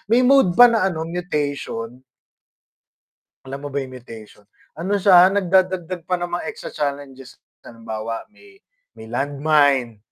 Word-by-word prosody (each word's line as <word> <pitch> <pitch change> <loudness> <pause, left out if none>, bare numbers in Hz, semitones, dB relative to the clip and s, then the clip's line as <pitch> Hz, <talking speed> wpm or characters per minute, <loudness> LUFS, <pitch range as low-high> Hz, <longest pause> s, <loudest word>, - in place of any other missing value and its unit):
May 245 - +5
mode 270 -8 +4
pa 245 - +10
na 225 -4 +1
ano 160 -2 -5
mutation. 145 -8 -4 1.4
Alam 135 +2 -8
mo - - -4
ba 140 - -1
yung 130 - -9
mutation, 110 -4 -14 0.3
ano 190 +4 -2
siya 180 -2 +7
nagdadagdag 185 -2 0
pa 185 - -1
ng 175 0 -3
mga 175 0 -4
extra 220 - -7
challenges 140 -3 -6 0.2
halimbawa 115 -1 -7
may 390 - -20 0.4
may 110 - -12
land 140 +3 -3
mine 140 -7 +2
150 Hz, 140 wpm, -20 LUFS, 130-185 Hz, 1.4 s, pa